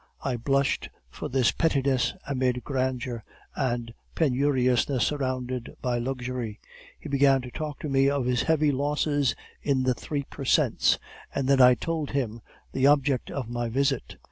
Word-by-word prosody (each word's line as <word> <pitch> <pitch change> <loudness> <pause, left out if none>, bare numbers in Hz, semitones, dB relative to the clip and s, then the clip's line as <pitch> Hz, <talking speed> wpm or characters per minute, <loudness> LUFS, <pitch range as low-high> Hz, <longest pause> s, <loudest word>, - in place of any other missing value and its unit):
I 135 -3 0
blushed 135 +3 0 0.2
for - - -6
this 125 -2 +3
pettiness 140 -5 +1
amid 125 -2 0
grandeur, 130 -4 -2 0.3
and 120 -3 -2 0.2
penuriousness 130 -3 +2
surrounded 130 -3 -3
by 125 -1 -1
luxury. 125 -3 -4 0.4
He - - -9
began 140 -1 +4
to 125 - -8
talk 150 -1 -5
to - - -3
me 135 0 +3
of 140 -3 0
his 125 -1 +1
heavy 155 -2 +2
losses 145 -1 +1 0.3
in 135 -3 +1
the 130 0 +2
three 140 +3 -4
per - - -9
cents, - - +3 0.4
and 135 -2 0
then 135 -1 +5
I 125 0 +8
told 160 +1 -3
him 120 -5 -2 0.3
the 135 +1 +3
object 140 -3 +2
of 135 -5 -4
my 120 0 -2
visit. 135 +1 0
130 Hz, 155 wpm, -27 LUFS, 125-140 Hz, 0.4 s, I